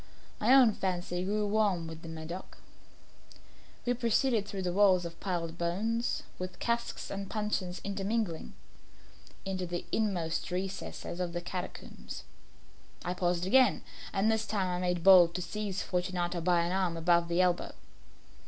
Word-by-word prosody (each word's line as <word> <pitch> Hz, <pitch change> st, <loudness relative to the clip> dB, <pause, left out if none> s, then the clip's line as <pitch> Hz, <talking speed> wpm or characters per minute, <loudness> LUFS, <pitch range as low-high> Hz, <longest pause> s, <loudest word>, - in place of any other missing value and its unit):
My 220 Hz, +4 st, +3 dB
own 250 Hz, -5 st, +7 dB
fancy 180 Hz, -2 st, -2 dB
grew 210 Hz, +2 st, 0 dB
warm 205 Hz, -5 st, +1 dB
with 160 Hz, 0 st, -8 dB
the 165 Hz, -, -8 dB
Medoc. 160 Hz, +3 st, -7 dB, 1.3 s
We 245 Hz, -, +2 dB
had 245 Hz, -, -2 dB
passed 235 Hz, +2 st, +3 dB, 0.2 s
through 190 Hz, -3 st, -3 dB
walls 190 Hz, -3 st, +5 dB
of 170 Hz, 0 st, -7 dB
piled 170 Hz, -3 st, -3 dB
bones, 220 Hz, +8 st, 0 dB, 0.2 s
with 185 Hz, 0 st, -5 dB
casks 235 Hz, 0 st, -2 dB
and 195 Hz, 0 st, -4 dB
puncheons 210 Hz, -4 st, -2 dB
intermingling, 200 Hz, -2 st, -2 dB, 0.9 s
into 185 Hz, -2 st, -2 dB
the 175 Hz, 0 st, -4 dB
inmost 180 Hz, -7 st, 0 dB
recesses 185 Hz, -1 st, -4 dB
of 175 Hz, -1 st, -2 dB
catacombs. 180 Hz, 0 st, -6 dB, 0.8 s
I 180 Hz, -, 0 dB
paused 180 Hz, -1 st, 0 dB
again, 255 Hz, +6 st, +4 dB, 0.3 s
and 205 Hz, +3 st, +2 dB
this 220 Hz, 0 st, 0 dB
time 195 Hz, -4 st, 0 dB
I 180 Hz, 0 st, -1 dB
made 180 Hz, -2 st, 0 dB
bold 180 Hz, -3 st, +8 dB
to 180 Hz, -, -1 dB
seize 205 Hz, +1 st, -3 dB
Fortunato 180 Hz, -1 st, -1 dB
by 175 Hz, 0 st, +3 dB
an 170 Hz, +1 st, -1 dB
arm 185 Hz, -3 st, 0 dB
above 170 Hz, +1 st, +3 dB
the 170 Hz, +1 st, 0 dB
elbow. 180 Hz, -1 st, +2 dB
185 Hz, 145 wpm, -31 LUFS, 175-205 Hz, 1.3 s, bold